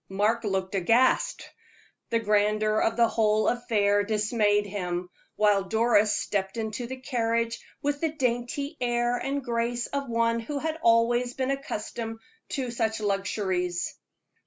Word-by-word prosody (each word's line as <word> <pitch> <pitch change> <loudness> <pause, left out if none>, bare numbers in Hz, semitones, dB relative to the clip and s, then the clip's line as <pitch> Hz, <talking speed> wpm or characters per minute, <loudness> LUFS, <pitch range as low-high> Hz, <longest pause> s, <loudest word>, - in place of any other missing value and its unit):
Mark 210 +5 +1
looked 190 -2 -2
aghast; 230 +7 +2 0.6
the 230 - +2
grandeur 215 0 +2
of 225 +1 +1
the 235 -1 +5
whole 215 -1 +2
affair 210 -4 +2
dismayed 210 0 +1
him; 180 -3 -4 0.2
while 205 -2 +3
Doris 220 0 +3
stepped 195 0 -2
into 220 +2 -3
the 260 +2 -6
carriage 230 -3 -1 0.2
with 290 0 -1
the 325 -2 +1
dainty 265 +2 -2
air 240 0 +1
and 275 +3 -2
grace 235 0 -1
of 280 -2 -4
one 230 0 +1
who 255 +6 -4
had 320 +2 -3
always 240 +1 +3
been 265 0 -1
accustomed 225 -4 -4 0.3
to 260 -4 -3
such 225 -2 -1
luxuries. 195 -3 -1
230 Hz, 135 wpm, -27 LUFS, 205-245 Hz, 0.6 s, the